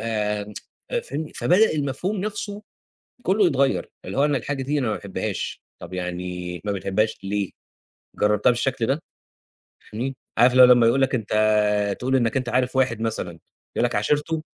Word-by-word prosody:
آآ، 105 -2 -3
فاهمني، 150 +4 -3
فبدأ 205 +6 +4
المفهوم 150 +8 -1
نفسْه 205 +1 -3 0.6
كلّه 195 0 +3
يتغيّر، 140 -4 +1
اللي - - -5
هو 140 - +5
أنا 145 -2 +2
الحاجة 135 +2 -3
دي 145 +3 0
أنا 130 -5 0
ما 110 - 0
باحبهاش، 100 -1 -4 0.2
طَب 85 +1 -10
يعني 90 -1 -4
ما 105 - -1
بتحبهاش 100 +3 0
ليه؟ 100 -1 -1 0.7
جربتها 105 +3 +3
بالشكل 120 -1 0
ده؟ 140 +4 0 0.9
فاهمني، 130 +5 -3 0.2
عارف 120 +2 +6
اللي 130 0 +8
هو 125 - +9
لمّا 120 -2 +6
يقول 135 +4 +3
لك 135 0 +2
أنت 110 -4 -4 0.7
تقول 130 +2 0
إنك 120 -1 +2
أنت 130 -2 -2
عارف 125 +1 0
واحد 125 -4 +1
مثلًا 110 -6 -1 0.4
يقول - - +2
لك - - -1
عاشرته؟ 150 +8 0
125 Hz, 165 wpm, -23 LUFS, 105-140 Hz, 0.9 s, هو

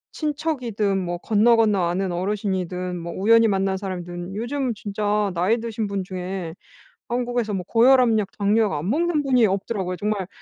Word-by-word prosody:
친척이든 255 -10 -1
뭐 175 0 -3
건너건너 215 -2 +3
아는 185 +1 -1
어르신이든 185 -1 -2
뭐 170 0 -6
우연히 230 +3 +4
만난 195 -1 0
사람이든 180 -1 -6
요즘 255 +4 -2
진짜 205 0 -1
나이 185 +6 +2
드신 225 -1 -3
분 200 -1 -3
중에 185 -2 -5 0.5
한국에서 240 -3 -1
뭐 190 -2 -2
고혈압약, 230 -2 +4
당뇨약 205 -1 +2
안 155 +5 -3
먹는 315 +3 +1
분이 255 -4 +4
없더라고요. 195 -1 -2
정말 205 -1 -2
205 Hz, 350 characters per minute, -23 LUFS, 185-230 Hz, 0.5 s, 우연히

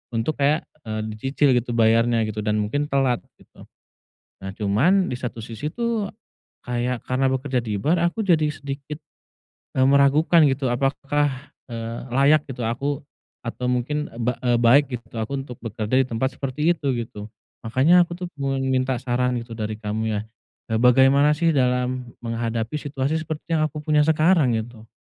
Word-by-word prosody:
untuk 120 +7 -1
kayak, 145 +3 +2 0.2
eee, 110 0 -3
dicicil 135 +5 +1
gitu 120 -1 0
bayarnya, 115 0 +3
gitu 110 0 -4
dan 105 0 0
mungkin 145 +8 -1
telat, 135 -4 +1 0.2
gitu. - - -18 0.8
Nah, 95 - -5
cuman 125 - +2
di 125 - -3
satu 120 -2 -5
sisi 115 +7 -6
tuh 235 -4 -2 0.6
kayak 125 0 -1
karena 130 +1 +1
bekerja 130 -2 -1
di 105 -3 -3
bar 160 - +2
aku 175 +6 -1
jadi 170 -7 +3
sedikit, 140 +1 -7 0.8
eee, 130 - +4
meragukan 140 +3 +5
gitu, 135 -2 0
apakah, 140 +2 -1 0.2
eee, 115 0 -5
layak 140 +4 +3
gitu 125 -2 -5
aku? 135 +5 -2 0.4
Atau 125 +1 -3
mungkin, 140 +5 -1
eee, 115 - -11
ba 125 - +2
eee, 120 -1 +2
baik 120 +5 +5
gitu 115 0 -14
aku 125 +6 -3
untuk 125 -4 -11
bekerja 110 +1 -4
di 130 - +2
tempat 130 +3 -2
seperti 150 +5 +1
itu, 140 -7 -2
gitu? 110 -3 -6 0.4
Makanya 160 +10 +4
aku 170 - -6
tuh 180 0 -5
pengen 135 -1 -1
minta 130 0 +1
saran 125 0 -1
gitu 115 0 -10
dari 110 0 -3
kamu 110 0 -2
ya, - - -2 0.5
eee, 110 - +2
bagaimana 135 +4 +5
sih 165 +2 +2
dalam 125 -2 0
menghadapi 115 +3 -2
situasi 145 +2 -2
seperti 160 +1 -3
yang 155 - +2
aku 150 +1 -7
punya 150 -1 +3
sekarang 155 -5 +3
gitu? 110 0 -7
130 Hz, 170 wpm, -23 LUFS, 115-145 Hz, 0.8 s, meragukan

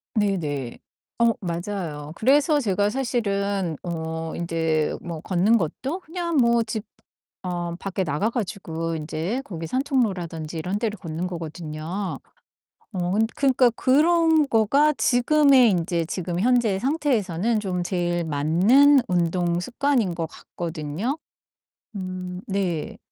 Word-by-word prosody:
네네. 155 - -1 0.4
어 235 0 +5
맞아요. 170 -4 -4
그래서 290 +5 +3
제가 205 -3 +1
사실은 200 - -1
어 160 -1 -4
인제 160 -2 0
뭐 165 -3 -6
걷는 195 +5 +3
것도 265 - -3
그냥 340 -1 -3
뭐 235 -2 +4
집 220 -2 -4 0.6
어 175 -1 -3
밖에 195 -1 -2
나가 160 +8 0
가지고 165 -7 -3
인제 160 - -3
거기 165 -4 -6
산책로라든지 185 - -1
이런 185 +5 -2
데를 215 -2 -2
걷는 165 +1 -4
거거든요. 165 +2 -5 0.7
어 180 -1 -1
근 220 +2 +3
그러니까 260 -3 +4
그런 315 +4 +3
거가 275 +7 +4
지금의 255 +1 +4
인제 170 -2 0
지금 175 0 -3
현재 235 -4 +3
상태에서는 235 - 0
좀 180 -3 -2
제일 175 -1 -1
맞는 185 - +5
운동 175 0 +1
습관인 245 -4 0
것 165 -1 -2
같거든요. 170 - -4 0.8
음 185 -1 -5
네. 185 -5 -2
190 Hz, 245 characters per minute, -24 LUFS, 170-240 Hz, 0.8 s, 어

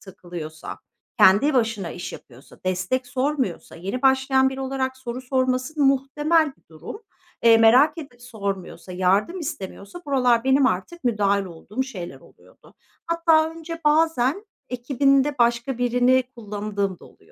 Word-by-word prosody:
takılıyorsa, 175 -5 -9 0.4
kendi 220 +10 +5
başına 220 -8 0
iş 175 - -7
yapıyorsa, 130 +2 -14
destek 185 +8 -1
sormuyorsa... 260 - -2
Yeni 195 +9 -5
başlayan 265 0 +3
biri 265 0 -6
olarak 265 -1 -2
soru 255 -1 -6
sorması 255 +3 -1
muhtemel 295 +4 +2
bir - - -33
durum. 160 - -10 0.4
Eee, 230 -1 +7
merak 250 +9 +5
edip 245 -6 -10
sormuyorsa, 200 -6 -6
yardım 195 - +1
istemiyorsa 285 - -7
buralar 250 -4 +2
benim 265 0 +4
artık 260 - -3
müdahil 200 -4 +1
olduğum 190 +8 -5
şeyler 195 -10 -8
oluyordu. - - -21 0.3
Hatta 330 -1 +3
önce 330 0 -8
bazen 315 - +2 0.2
ekibinde 275 +3 +1
başka 235 +1 +1
birini 245 +1 +3
kullandığım 205 -4 -4
da - - -16
oluyor. - - -19
255 Hz, 130 wpm, -23 LUFS, 205-275 Hz, 0.4 s, Eee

